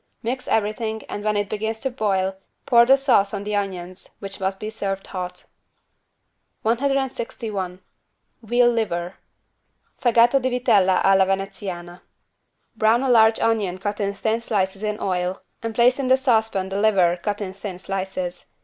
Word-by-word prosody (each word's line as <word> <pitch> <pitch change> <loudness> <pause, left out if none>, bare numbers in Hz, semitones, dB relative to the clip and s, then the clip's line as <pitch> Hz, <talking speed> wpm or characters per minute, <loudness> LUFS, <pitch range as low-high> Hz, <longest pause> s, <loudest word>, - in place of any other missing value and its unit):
Mix 250 +3 -3
everything 220 +1 -1
and 205 - -5
when 210 -1 +1
it 205 0 0
begins 220 +2 -3
to 265 - -2
boil 195 -5 0 0.3
pour 235 -3 +5
the 270 +1 +7
sauce 220 -7 +2
on 200 - -4
the 210 0 -2
onions, 185 -2 -4
which 195 -1 -6
must 190 0 -2
be 215 0 -5
served 195 -3 -4
hot. 180 -1 -6 1.2
161 230 -6 -2 0.6
VEAL 240 +2 +3
LIVER 180 -6 -2 0.9
(Fegato 240 +1 +4
di 260 - 0
vitella 200 -7 +3
alla 195 -1 +5
veneziana) 190 -2 -4 0.7
Brown 225 +3 +3
a 265 - 0
large 220 -1 +5
onion 210 -5 +1
cut 205 +2 -4
in 200 -1 0
thin 220 +3 -1
slices 195 -3 -1
in 210 0 -2
oil 180 0 -1 0.2
and 225 -1 -4
place 245 +3 +4
in 270 - -1
the 260 +1 +5
saucepan 220 -7 +1
the 195 +1 -2
liver 185 -5 +3
cut 205 -1 -2
in 190 -3 -5
thin 195 -2 -7
slices. 185 -2 -4
205 Hz, 155 wpm, -23 LUFS, 190-230 Hz, 1.2 s, the